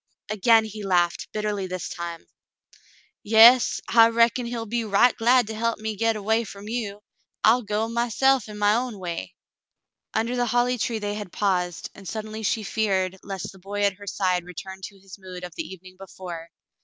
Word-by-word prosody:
Again 220 +2 +4
he 215 0 -8
laughed, 175 -3 +1
bitterly 210 -2 -2
this 185 -2 -4
time. 170 -1 -6 0.5
" - - -31
Yas 235 +3 +7
— - - -30
I 230 -1 +6
reckon 235 +1 +2
he'll 235 -1 -4
be 235 +2 -2
right 220 +4 +4
glad 245 +1 +4
to 220 - -6
help 230 +1 -1
me 215 0 -4
get 225 +2 +1
away 220 +2 +1
from 200 -1 -10
you. 215 -3 -4 0.4
I'll 230 +3 +5
go 210 0 -1
myse'f 240 +1 +1
in 210 - -8
my 205 0 +3
own 240 -1 -1
way." 170 - -6 0.8
Under 230 +3 0
the 245 -1 0
holly 245 +1 +1
tree 230 +1 -1
they 205 -1 -3
had 205 -3 -6
paused, 180 -4 -1
and 195 -1 -12
suddenly 215 +1 -5
she 220 +1 0
feared 190 -3 -1
lest 195 -2 -6
the 190 - -16
boy 200 +2 -5
at 200 -1 +1
her 205 - -11
side 185 -3 0
return 190 +2 -9
to 200 +1 -11
his 195 +1 -13
mood 185 -1 -9
of 180 - -7
the 330 - -5
evening 185 0 -12
before. 175 -3 -8
210 Hz, 195 wpm, -24 LUFS, 190-230 Hz, 0.8 s, Yas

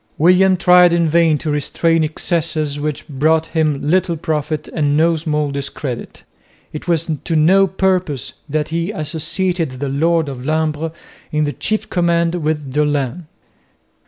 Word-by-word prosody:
William 185 +3 +4
tried 180 -1 +6
in 170 -1 +2
vain 160 -1 +3
to 155 +1 -3
restrain 165 +3 +1
excesses 155 -2 -1
which 150 -1 -4
brought 155 +3 +1
him 155 -3 0
little 175 0 +1
profit 155 -1 -2
and 145 -2 0
no 165 +1 +3
small 150 -2 -1
discredit. 140 -2 -5 0.5
It 150 - -7
was 165 -2 +1 0.2
to 165 - -2
no 190 +6 +5
purpose 185 -7 -1 0.2
that 150 +1 -1
he 165 +2 -2
associated 165 -2 -2
the 135 +2 -4
lord 160 +3 +1
of 130 -3 -6
Lumbres 155 +1 -1 0.4
in 150 0 +1
the 145 -1 -1
chief 215 0 -2
command 170 -1 +1
with 150 -5 -2
Dolhain. 150 +2 -1
160 Hz, 145 wpm, -18 LUFS, 150-170 Hz, 0.5 s, tried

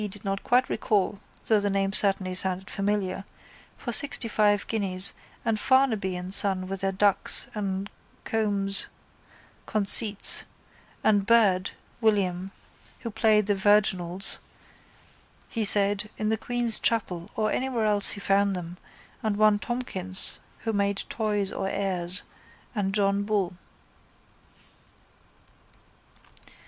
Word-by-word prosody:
did 205 +1 -12
not 195 0 -3
quite 250 +1 +2
recall 205 -2 -1 0.3
though 220 -2 +2
the 205 0 -1
name 195 0 -1
certainly 195 -3 +4
sounded 185 +1 -2
familiar, 195 -1 -2 0.5
for 240 - -6
sixtyfive 215 -5 +4
guineas 195 -3 0 0.3
and 225 -2 -1
Farnaby 225 -9 +1
and 180 +1 -3
son 190 -2 +6
with 195 0 -6
their 195 0 -1
dux 200 +1 +2
and 195 -2 -4 0.4
comes 200 -3 0 0.8
conceits 210 0 +3 0.6
and 205 -2 +1
Byrd 200 -5 +2 0.3
(William) 190 -4 0 0.5
who 230 - -6
played 215 -1 +2
the 205 - +1
virginals, 195 -2 0 1.1
he 230 - -3
said, 205 0 +3
in 215 0 -2
the 220 - +1
Queen's 240 0 0
chapel 180 -7 -2
or 215 -1 -1
anywhere 250 -4 -2
else 205 -1 +5
he - - -3
found 195 0 +1
them 175 0 -8 0.4
and 215 -2 -2
one 215 -1 +3
Tomkins 190 -7 -2 0.2
who 225 - -3
made 200 -1 -1
toys 210 -3 -2
or 195 - -3
airs 185 -2 -2 0.5
and 200 -3 -2
John 200 -1 +1
Bull. 200 -3 -2
200 Hz, 120 wpm, -25 LUFS, 190-215 Hz, 1.1 s, son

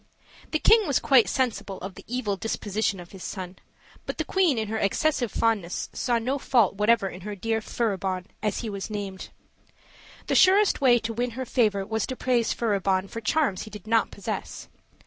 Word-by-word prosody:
The 310 - +1
king 445 +5 +5
was 280 - +2
quite 260 -5 +4
sensible 235 -7 -1
of 190 +1 -6
the - - -12
evil 230 -4 -1
disposition 205 -1 -2
of 175 -1 -11
his 190 -2 -10
son, 185 -2 -6 0.5
but - - -4
the - - -2
queen 360 -9 +2
in 220 -1 -1
her 220 +1 -2
excessive 245 +3 +1
fondness 210 -6 0
saw 240 -2 0
no 255 +5 -1
fault 235 -7 +3
whatever 210 +1 +2
in 185 0 -8
her 205 +2 -5
dear 225 +3 -1
Furibon, 190 -5 -2 0.2
as 210 -2 -1
he 230 - -4
was 200 +1 -5
named. 200 -3 -5 1.0
The - - -1
surest 390 -2 +5
way 250 -3 +6
to 230 0 -3
win 240 +2 -1
her 260 - -3
favor 210 -6 +1
was 220 0 -2
to 260 - -4
praise 245 -3 +1
Furibon 195 -4 0
for 230 - -5
charms 255 - +1
he 215 - -7
did 210 -2 -10
not 225 0 +2
possess. - - -6
220 Hz, 190 wpm, -26 LUFS, 195-245 Hz, 1.0 s, way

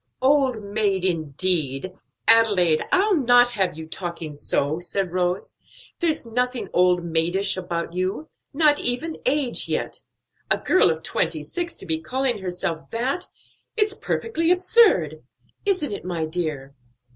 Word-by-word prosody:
"Old 260 -4 +2
maid, 200 -2 0
indeed! 160 -1 +1 0.3
Adelaide, 205 -8 +5
I'll 395 +1 +3
not 245 -4 +4
have 190 -8 -1
you 160 - -7
talking 170 -2 -6
so," 145 +1 -1
said 180 +1 -3
Rose. 180 +1 -2 0.4
"There's 325 -7 0
nothing 250 +2 -2
old 180 -1 +3
maidish 170 +4 +1
about 170 -2 -4
you; 185 - -3 0.2
not 300 0 +3
even 310 +7 -2
age 270 -2 +2
yet; - - -3 0.5
a - - +4
girl 370 - +3
of 160 0 -3
twenty 160 -2 -1
six 340 - -5
to - - -7
be 160 -2 +1
calling 255 +5 -1
herself 180 -3 -4
that! 255 +9 -2 0.5
it's 420 -1 +2
perfectly 375 -5 -2
absurd. 380 +6 +3 0.5
Isn't 360 - 0
it, - - -6
my 170 -3 -3
dear?" 155 -5 -4
190 Hz, 135 wpm, -23 LUFS, 170-265 Hz, 0.5 s, Adelaide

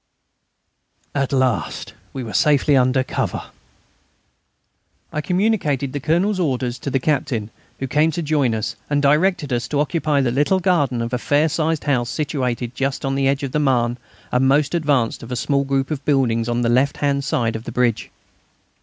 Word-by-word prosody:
At 140 -2 -1
last 130 - -1 0.2
we 130 - -5
were 110 - -7
safely 145 -1 +3
under 130 0 +3
cover! - - -3 1.6
I 155 - -1
communicated 180 - 0
the 145 - -2
Colonel's 175 +8 +1
orders 130 -7 -1
to - - -4
the 135 - +1
Captain, 125 -6 -1 0.3
who 135 - -3
came 150 +5 +2
to 170 - -2
join 145 -6 +1
us, 110 +1 -3
and 145 -1 +2
directed 150 0 +2
us 120 -1 -1
to 145 - -1
occupy 150 -1 +1
the 125 -3 +1
little 145 +9 +2
garden 145 -10 +1
of 115 +2 -5
a 125 - 0
fair 145 +4 +2
sized 160 0 -1
house 125 -5 0
situated 125 -5 -2
just 135 +2 -2
on 135 - 0
the 135 0 +1
edge 140 +1 0
of 135 - -3
the 150 - 0
Marne 125 -4 +1 0.3
and 125 +1 +2
the - - +4
most 145 +2 +2
advanced 145 -8 +1
of 115 - -9
the 125 - -3
small 140 +4 +1
group 135 +1 -1
of 145 -3 -3
buildings 120 -5 +1
on 120 0 0
the - - +1
left 130 +4 +2
hand 140 -1 0
side 115 -4 0
of 110 +1 -6
the - - -5
bridge. 120 -2 0
135 Hz, 190 wpm, -21 LUFS, 125-150 Hz, 1.6 s, the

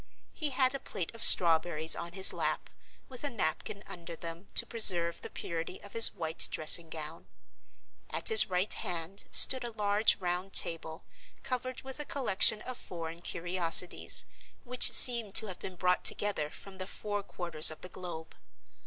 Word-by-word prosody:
He 305 -3 -6
had 260 -1 -2
a 275 - -6
plate 180 -8 -9
of 230 - -7
strawberries 160 -2 +4
on 170 0 -10
his 190 -1 +3
lap, - - -7 0.4
with 255 0 -11
a 290 - -4
napkin 200 - -6
under 170 -1 -11
them 170 +3 -11
to - - 0
preserve 175 -7 0
the - - -12
purity 170 +2 -10
of 205 - -16
his 230 0 +7
white 160 -3 0
dressing 160 +1 +2
gown. 160 0 -12 0.8
At - - -4
his 445 -1 +5
right 185 +3 -2
hand 175 +2 -8
stood 260 -1 +6
a 240 - -7
large 210 -1 -1
round 180 +1 -7
table, 160 -1 -1 0.4
covered 255 0 -8
with 265 +2 -12
a 295 - -7
collection 215 -6 0
of 255 -1 -9
foreign 165 -1 -11
curiosities, 175 0 0 0.4
which 250 0 0
seemed 235 -6 +7
to - - +1
have 190 -4 -12
been 185 - -12
brought 180 +1 -4
together 200 -8 -1
from 190 +4 -16
the 185 - -9
four 205 0 -8
quarters 170 -5 +2
of 155 - -11
the - - -11
globe. 175 -3 -12
185 Hz, 170 wpm, -27 LUFS, 170-220 Hz, 0.8 s, his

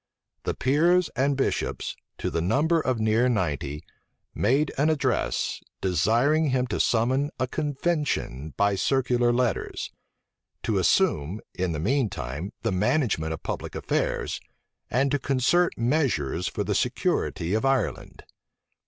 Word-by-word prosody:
The - - -1
peers 170 +6 +3
and 135 +1 +1
bishops, 135 - -1 0.2
to - - -3
the 85 - 0
number 150 - +2
of 130 -5 0
near 110 +3 +3
ninety, 75 - -1 0.5
made 135 +8 +2
an 145 +3 +2
address, 155 -2 0 0.2
desiring 120 - +2
him 130 -1 +1
to - - -1
summon 130 +5 +2
a 130 - +2
convention 145 - -2
by 100 0 +3
circular 120 +3 +2
letters; 120 -2 -1 0.7
to - - +1
assume, 80 +9 +2
in 90 -1 -1
the 75 - -3
mean 125 - +1
time, 70 +8 -5
the - - +1
management 95 - +1
of 80 - -5
public - - -4
affairs; - - -1 0.5
and 135 +3 +1
to 145 - +1
concert 140 +7 +2
measures 115 - 0
for - - -2
the - - -1
security 85 +3 0
of 110 - +1
Ireland. 135 -3 -1
125 Hz, 135 wpm, -26 LUFS, 95-140 Hz, 0.7 s, peers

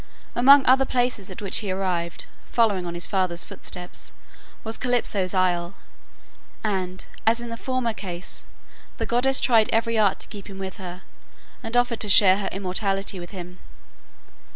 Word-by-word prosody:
Among 275 +3 +7
other 265 +1 +5
places 245 -6 0
at 185 +2 -8
which 195 - +1
he 210 - -2
arrived, 180 -3 -2 0.2
following 205 -6 +2
on 170 - -5
his 175 - -2
father's 185 -3 0
footsteps, 180 0 -5 0.5
was 225 0 -3
Calypso's 210 -7 0
isle, 180 0 +1 0.9
and, 185 -3 -2 0.2
as 230 +1 +4
in 240 0 -6
the 230 - -4
former 255 -1 -2
case, 175 - -7 0.5
the - - -2
goddess 265 +3 +3
tried 225 -4 +4
every 230 0 +1
art 205 -3 +3
to - - -3
keep 205 -1 -10
him 195 -2 -9
with 190 +1 -6
her, 180 -1 -8 0.6
and 225 +2 -2
offered 245 -1 +2
to 210 - +1
share 190 -1 +7
her 200 - -2
immortality 195 0 -1
with 175 0 -8
him. 180 -2 -9
195 Hz, 160 wpm, -24 LUFS, 185-230 Hz, 0.9 s, Among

